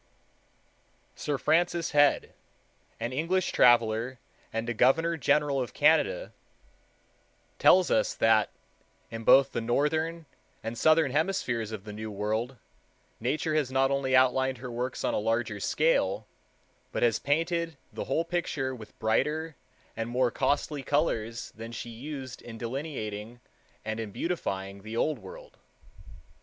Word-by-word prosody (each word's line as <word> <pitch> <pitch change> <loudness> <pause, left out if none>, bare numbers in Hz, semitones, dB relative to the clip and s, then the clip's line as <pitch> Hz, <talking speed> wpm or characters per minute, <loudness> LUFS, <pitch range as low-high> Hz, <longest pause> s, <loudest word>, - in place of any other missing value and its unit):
Sir 145 -2 -2
Francis 170 +3 +1
Head, 145 -1 +3 0.7
an 120 +2 -3
English 170 +6 0
traveler 120 +1 +4 0.3
and 115 +1 -3
a 120 - -1
Governor 160 +9 +3
General 145 -1 +2
of 125 - -5
Canada, - - +3 1.3
tells 185 -1 +5
us 275 - +2
that 110 -1 +3 0.6
"in 115 0 -6
both 135 +3 +6
the 120 - -2
northern 155 +7 0 0.4
and 115 +1 -4
southern 155 +1 +4
hemispheres 130 - -1
of 110 -3 -6
the 105 0 -8
New 110 +1 -6
World, 110 +5 -2 0.6
Nature 155 +6 -1
has 150 -4 +1
not 135 +1 +2
only 135 -1 +1
outlined 130 0 +3
her 125 +1 -7
works 125 +2 -3
on - - 0
a - - +1
larger 115 0 -1
scale, 105 -7 +1 0.7
but - - -1
has 115 -2 +3
painted 165 +2 0 0.2
the - - -4
whole 160 +5 0
picture 155 -6 -2
with 110 -4 -11
brighter 150 +8 0 0.4
and 115 +1 -3
more 125 0 +1
costly 145 +3 0
colors 120 -6 -1
than 115 +1 -9
she 120 +1 -6
used 130 0 -7
in 115 -1 -9
delineating 115 -3 -5 0.5
and 110 +1 -3
in 110 -2 -4
beautifying 100 - -3
the 110 +3 -6
Old 155 +5 0
World.... - - -12
130 Hz, 135 wpm, -28 LUFS, 115-155 Hz, 1.3 s, both